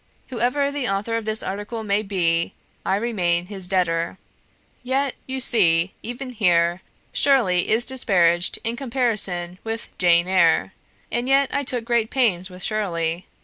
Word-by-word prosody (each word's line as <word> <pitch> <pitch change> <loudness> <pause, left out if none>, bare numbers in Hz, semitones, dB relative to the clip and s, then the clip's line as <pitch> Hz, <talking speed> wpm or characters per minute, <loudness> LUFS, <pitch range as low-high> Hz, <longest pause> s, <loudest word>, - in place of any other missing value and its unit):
Whoever 255 +4 0
the 285 -5 -2
author 200 +4 -1
of 230 -1 -3
this 215 0 +1
article 205 +4 -5
may 205 0 +1
be, 170 -5 0 0.3
I 190 - +1
remain 180 -6 0
his 190 -1 -4
debtor. 180 -2 0 0.6
"Yet, 265 +2 0
you 265 0 -3
see, 185 -8 +3
even 245 +3 -6
here, 175 -5 +2 0.3
Shirley 220 -11 +3
is 230 +2 +4
disparaged 180 -9 +2
in 230 0 -2
comparison 215 -9 -1
with 225 0 -5
"Jane 175 -1 +4
Eyre"; 185 0 +3 0.4
and 240 +3 -1
yet 275 0 +3
I 285 - +1
took 250 -4 -3
great 235 -2 +1
pains 200 -9 +1
with 180 0 -8
Shirley. 175 -5 -2
205 Hz, 145 wpm, -22 LUFS, 180-240 Hz, 0.6 s, is